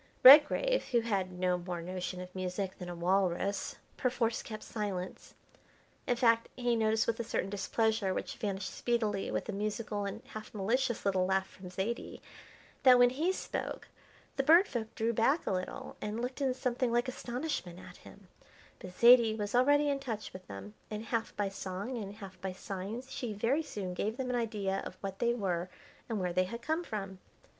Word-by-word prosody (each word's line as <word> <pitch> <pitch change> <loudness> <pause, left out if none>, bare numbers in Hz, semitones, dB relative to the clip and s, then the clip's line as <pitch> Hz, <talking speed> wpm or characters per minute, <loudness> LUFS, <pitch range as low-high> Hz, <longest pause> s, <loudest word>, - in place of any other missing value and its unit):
Redgrave, 300 - +8
who 240 -2 +2
had 195 -5 -1
no 180 0 0
more 175 0 -4
notion 180 +1 -4
of 180 0 -9
music 185 +1 -3
than 180 -1 -6
a 175 - -5
walrus, 190 +2 0 0.2
perforce 240 -3 0
kept 215 -2 -7
silence. 195 -4 -5 0.7
In 245 - +3
fact, 230 -1 +3
he 245 -1 +1
noticed 220 -1 +2
with 230 0 -1
a - - 0
certain 195 -3 -2
displeasure 205 +1 +1
which - - -4
vanished 195 -3 -3
speedily 220 -5 0
with - - -2
a - - -2
musical, 210 0 -2
and 200 - -5
half 215 0 -9
malicious 235 +4 0
little 190 -2 +2
laugh 190 0 +2
from 185 -1 -11
Zaidie, 195 +6 -3 0.6
that 255 -2 +8
when 245 0 +6
he 315 +8 +1
spoke 380 - -4 0.5
the - - +4
Bird 335 +7 +7
Folk 225 -2 -4
drew 230 +1 0
back 265 +9 +2
a - - 0
little 185 -1 -4
and 210 +2 -3
looked 250 +3 -4
in 260 -2 +1
something 250 -1 0
like 240 +1 +2
astonishment 245 - -4
at - - -12
him; - - -15 0.5
but 180 -1 -10
Zaidie 235 -2 +7
was 205 -1 -3
already 290 +4 +4
in 280 -1 +1
touch 225 -6 -5
with 185 - -10
them, 100 +1 -8 0.2
and 215 +1 -5
half 230 -1 -2
by 205 -1 0
song 195 +5 -5
and 200 0 -7
half 190 -3 -11
by 190 -1 -3
signs 205 +8 -6
she 235 -4 -3
very 235 +9 +1
soon 195 - -5
gave 215 +5 -2
them 255 -2 -2
an - - 0
idea 210 -5 -1
of 185 - -8
what 195 -1 -5
they 235 0 +2
were 180 -5 -1 0.4
and 220 -3 -1
where 180 -2 -1
they 185 +1 +3
had 235 +5 -7
come 315 +5 0
from. 195 - -5
215 Hz, 190 wpm, -32 LUFS, 190-240 Hz, 0.7 s, Redgrave